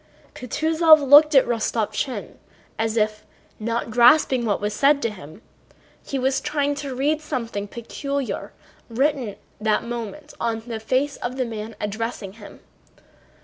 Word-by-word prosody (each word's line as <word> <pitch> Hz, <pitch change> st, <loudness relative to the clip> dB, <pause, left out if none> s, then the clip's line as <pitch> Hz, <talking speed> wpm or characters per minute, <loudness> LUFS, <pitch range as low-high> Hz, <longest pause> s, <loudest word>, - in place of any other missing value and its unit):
Kutúzov 315 Hz, +3 st, +3 dB
looked 295 Hz, +2 st, +7 dB
at 270 Hz, -, +7 dB
Rostopchín 235 Hz, +2 st, -2 dB, 0.4 s
as 225 Hz, 0 st, 0 dB
if, 215 Hz, 0 st, 0 dB, 0.4 s
not 230 Hz, +1 st, -2 dB
grasping 245 Hz, +1 st, +5 dB
what 205 Hz, -3 st, 0 dB
was 210 Hz, 0 st, -2 dB
said 280 Hz, +5 st, +4 dB
to 230 Hz, -, 0 dB
him, 170 Hz, 0 st, -12 dB, 0.6 s
he 275 Hz, -, -4 dB
was 265 Hz, +1 st, 0 dB
trying 290 Hz, -1 st, 0 dB
to 280 Hz, -2 st, -5 dB
read 295 Hz, +4 st, 0 dB
something 235 Hz, -9 st, -4 dB
peculiar 275 Hz, +5 st, -4 dB, 0.4 s
written 270 Hz, +1 st, 0 dB
at 200 Hz, -, -11 dB, 0.2 s
that 215 Hz, 0 st, +1 dB
moment 240 Hz, +5 st, -6 dB
on 230 Hz, -1 st, -1 dB
the 230 Hz, -2 st, -5 dB
face 260 Hz, +6 st, 0 dB
of 250 Hz, +2 st, -5 dB
the 255 Hz, -, 0 dB
man 220 Hz, -1 st, -6 dB
addressing 210 Hz, -1 st, -4 dB
him. 210 Hz, -1 st, -13 dB
240 Hz, 145 wpm, -23 LUFS, 220-280 Hz, 0.6 s, looked